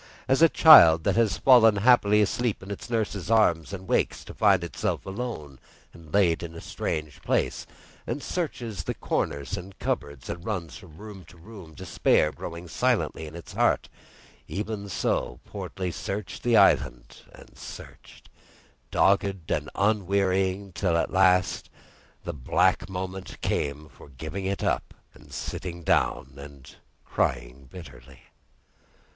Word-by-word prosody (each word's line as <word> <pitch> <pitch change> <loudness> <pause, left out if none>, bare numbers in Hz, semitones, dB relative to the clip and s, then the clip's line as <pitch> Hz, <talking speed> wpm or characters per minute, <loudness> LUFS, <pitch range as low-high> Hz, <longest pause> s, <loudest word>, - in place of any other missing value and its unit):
As 135 +3 +2
a 165 - +7
child 85 - +8
that - - +1
has 110 -4 +2
fallen 120 -5 +6
happily 105 -1 +4
asleep 115 0 -2
in 100 - -8
its 100 - -7
nurse's 105 -5 -2
arms, 85 -8 +2
and 95 -1 -7
wakes - - 0
to - - -10
find 100 -4 +3
itself 85 - -3
alone 95 - -6 0.3
and 80 -2 -15
laid 90 -4 +2
in 85 -1 -7
a - - -7
strange 75 -4 -5
place, - - -1 0.4
and 130 +5 -4
searches 120 - -4 0.2
corners 70 +5 -2
and 95 +1 -10
cupboards, 70 -3 -4
and 85 - -6
runs 90 -6 -4
from 80 -4 -14
room 105 -3 -10
to 85 - -17
room, 90 -3 -13
despair 75 +2 +1
growing 85 +2 -8
silently 80 -1 -1
in 75 - -11
its 85 - -10
heart, - - +1 0.6
even 105 0 -5
so - - -2
Portly 90 -2 -5
searched 100 +4 -5
the 120 -2 +3
island - - +2
and - - -16
searched, - - -12 0.6
dogged 95 -3 +1
and 75 0 -1
unwearying, 100 -1 0
till 85 -1 0
at - - -1
last 95 -1 +2 0.5
the 85 - -5
black 70 +6 +1
moment 95 0 -6
came 75 +2 -2
for 70 - -16
giving 80 +8 -6
it 100 0 -3
up, - - -1 0.2
and - - -18
sitting 85 -2 -6
down 70 - 0
and 70 -1 -12 0.3
crying 65 +2 -2
bitterly. 70 -8 -13
95 Hz, 140 wpm, -26 LUFS, 80-105 Hz, 0.6 s, child